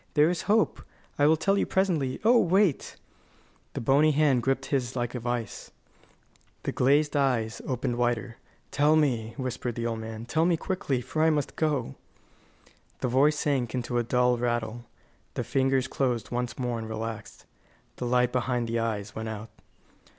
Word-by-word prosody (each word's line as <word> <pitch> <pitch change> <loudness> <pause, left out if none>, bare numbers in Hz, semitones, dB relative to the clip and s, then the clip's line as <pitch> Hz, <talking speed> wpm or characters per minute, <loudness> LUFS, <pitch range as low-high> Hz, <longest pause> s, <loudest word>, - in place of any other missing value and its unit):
There 150 +3 +5
is 175 - -2
hope 215 +1 +2 0.4
I 145 - +5
will 160 +1 +4
tell 195 +6 +1
you - - 0
presently 165 -9 0
oh, 240 +1 +6
wait!" 185 -4 +2 0.8
The - - -4
bony 140 +6 +4
hand 140 -4 +3
gripped 135 +1 0
his 130 -2 0
like 120 -1 -2
a 125 - -3
vice; 120 -1 -4 0.9
the - - -1
glazed 145 +4 +2
eyes 125 -5 0
opened 125 -1 -2
wider. 120 -1 -1 0.3
"Tell 150 +2 +3
me," 120 -7 +1
whispered 125 -3 -3
the 120 - -3
old 115 -1 -2
man; 110 0 -7
"tell 155 +6 +1
me 175 -2 +2
quickly, 145 -8 -2
for 155 +5 -3
I 160 - +5
must 150 -2 -1
go." 145 - -1 1.1
The 125 - 0
voice 145 +5 +3
sank 135 -5 0
into 120 -1 -1
a - - +1
dull 125 +1 +2
rattle. 120 -1 -2 0.5
The - - -1
fingers 130 +1 +1
closed 125 -4 -1
once 125 0 -3
more, 125 -2 -2
and 110 0 -6
relaxed. 110 -1 -6 0.5
The 125 - -4
light 125 0 +2
behind 125 -1 -1
the 115 0 -1
eyes 105 -3 -3
went 110 0 -5
out. 110 0 -7
125 Hz, 170 wpm, -27 LUFS, 120-145 Hz, 1.1 s, oh